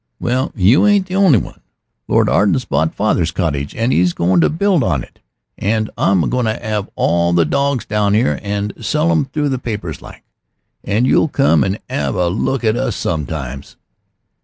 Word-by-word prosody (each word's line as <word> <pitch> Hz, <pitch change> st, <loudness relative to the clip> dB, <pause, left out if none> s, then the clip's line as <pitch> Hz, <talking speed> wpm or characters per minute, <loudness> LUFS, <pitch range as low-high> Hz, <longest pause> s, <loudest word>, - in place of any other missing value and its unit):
Well, 130 Hz, +2 st, -1 dB
you 115 Hz, -, +4 dB
ain't 205 Hz, -2 st, +3 dB
the 185 Hz, 0 st, -5 dB
only 190 Hz, -10 st, +5 dB
one. 90 Hz, -, -6 dB, 0.5 s
Lord -, -, +2 dB
Arden's 105 Hz, +6 st, +2 dB
bought 80 Hz, 0 st, -1 dB
father's 95 Hz, -5 st, +1 dB
cottage 80 Hz, -6 st, -3 dB
an' 115 Hz, +3 st, 0 dB
'e's 90 Hz, 0 st, +2 dB
goin' 90 Hz, 0 st, +2 dB
to -, -, +3 dB
build 180 Hz, -2 st, +1 dB
on 80 Hz, -, 0 dB
to -, -, -7 dB
it, -, -, -27 dB, 0.4 s
and 110 Hz, +1 st, -1 dB
I'm 95 Hz, -4 st, +2 dB
to 125 Hz, -, -1 dB, 0.4 s
'ave 105 Hz, -2 st, -3 dB
all 85 Hz, 0 st, +1 dB
the 85 Hz, -1 st, +3 dB
dawgs 140 Hz, -, 0 dB
down 105 Hz, -1 st, +1 dB
'ere, 75 Hz, -, +1 dB
and 100 Hz, 0 st, -3 dB
sell 150 Hz, +9 st, +1 dB
'em 160 Hz, -5 st, +1 dB
through 145 Hz, +2 st, -2 dB
the 130 Hz, -2 st, -2 dB
papers 105 Hz, -, -5 dB
like. -, -, -13 dB, 0.6 s
And 105 Hz, +5 st, 0 dB
you'll 145 Hz, -, +3 dB
come 135 Hz, -, +2 dB
an' 95 Hz, +2 st, -1 dB
'ave -, -, -2 dB
a 90 Hz, -1 st, +1 dB
look 120 Hz, +7 st, -2 dB
at 110 Hz, 0 st, +2 dB
us 120 Hz, -3 st, -2 dB
sometimes." 75 Hz, -4 st, -4 dB
105 Hz, 185 wpm, -17 LUFS, 85-135 Hz, 0.6 s, only